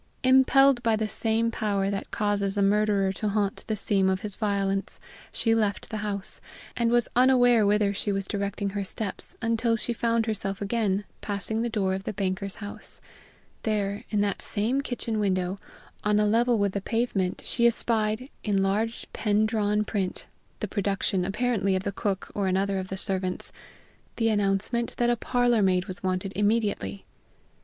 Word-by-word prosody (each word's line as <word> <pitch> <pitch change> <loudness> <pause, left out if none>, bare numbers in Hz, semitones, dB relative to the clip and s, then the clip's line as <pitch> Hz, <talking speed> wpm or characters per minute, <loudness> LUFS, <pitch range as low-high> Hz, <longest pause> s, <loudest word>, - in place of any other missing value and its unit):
Impelled 265 0 +5
by 230 -2 +2
the 215 0 -1
same 225 +2 +1
power 200 -3 0
that 195 - -4
causes 205 -2 0
a 200 - +3
murderer 200 -1 +3
to 210 +2 -2
haunt 200 -1 -1
the 220 - 0
scene 195 -2 +2
of 190 0 0
his 205 -3 -4
violence, 200 -2 -1 0.3
she 225 - +2
left 210 -3 0
the 220 - -2
house, 205 -2 -2 0.3
and 235 -1 +1
was 240 -1 +3
unaware 245 -3 +5
whither 205 -1 +3
she 205 +1 -2
was 195 -1 -1
directing 200 -1 -2
her 200 0 -2
steps 195 +1 -4
until 230 0 +2
she 235 - -1
found 230 -1 +1
herself 200 -3 -2
again 205 -1 0 0.2
passing 210 +2 -2
the 240 - 0
door 200 -4 0
of 190 0 -3
the - - -4
banker's 195 0 -2
house; 205 -1 -6 0.6
there, 205 -2 -1
in 210 -2 +1
that 200 -2 -1
same 230 +7 0
kitchen 235 -4 -3
window, 185 -1 0 0.4
on 210 0 +3
a 210 - +3
level 235 +3 +3
with 200 -2 +1
the 200 - -3
pavement, 200 -4 -1
she 235 0 +3
espied, 225 +2 0
in 200 -2 +1
large 215 +4 -1
pen 215 0 +2
drawn 210 -1 +1
print, 195 -4 -2 0.4
the 210 - -1
production 195 -2 0
apparently 200 0 0
of 185 - -1
the 200 - -1
cook 195 -1 -3
or 200 -2 0
another 195 +1 +1
of 185 - -5
the 190 - -5
servants, 185 -1 -2 0.6
the 225 -1 +2
announcement 210 +3 0
that 240 0 +3
a - - +3
parlor 245 -1 +2
maid 185 -2 +2
was 185 -3 -7
wanted 185 +1 -2
immediately. 205 - 0
205 Hz, 175 wpm, -27 LUFS, 195-225 Hz, 0.6 s, Impelled